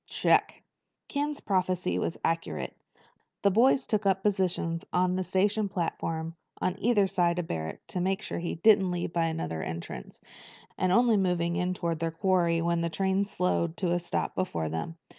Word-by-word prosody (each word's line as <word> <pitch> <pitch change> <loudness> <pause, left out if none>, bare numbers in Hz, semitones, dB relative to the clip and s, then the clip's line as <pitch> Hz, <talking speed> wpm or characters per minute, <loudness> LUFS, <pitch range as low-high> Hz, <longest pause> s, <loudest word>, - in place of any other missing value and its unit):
"Check." - - +2 0.5
Ken's 290 0 -2
prophecy 185 -2 0
was - - -2
accurate. 165 0 -2 0.7
They 200 - +5
boys 255 +6 +4
took 210 -2 0
up 190 0 +2
positions 180 -4 0
on 180 0 +2
the 185 - 0
station 200 +3 +1
platform 165 -3 -3 0.3
on 185 - 0
either 215 -3 +3
side 175 -2 +1
of 175 - -1
Barrack 80 -1 -5
to 180 - -2
make 190 +1 0
sure - - -3
he 170 - -3
didn't 195 +1 +5
leave 175 -1 -3
by 170 -1 +2
another 160 - -3
entrance, 80 -7 -6 0.6
and 185 -1 +1
only 235 +1 +4
moved 180 -3 +1
in 180 +2 -1
toward 170 -3 -2
their 165 0 0
quarry 170 0 +1
when 170 0 +1
a 170 - 0
train 190 +3 +1
slowed 180 -4 -1
to 180 -3 0
a 175 - +2
stop 175 - -2
before 80 - -2
them. 80 - -4
180 Hz, 175 wpm, -28 LUFS, 165-195 Hz, 0.7 s, They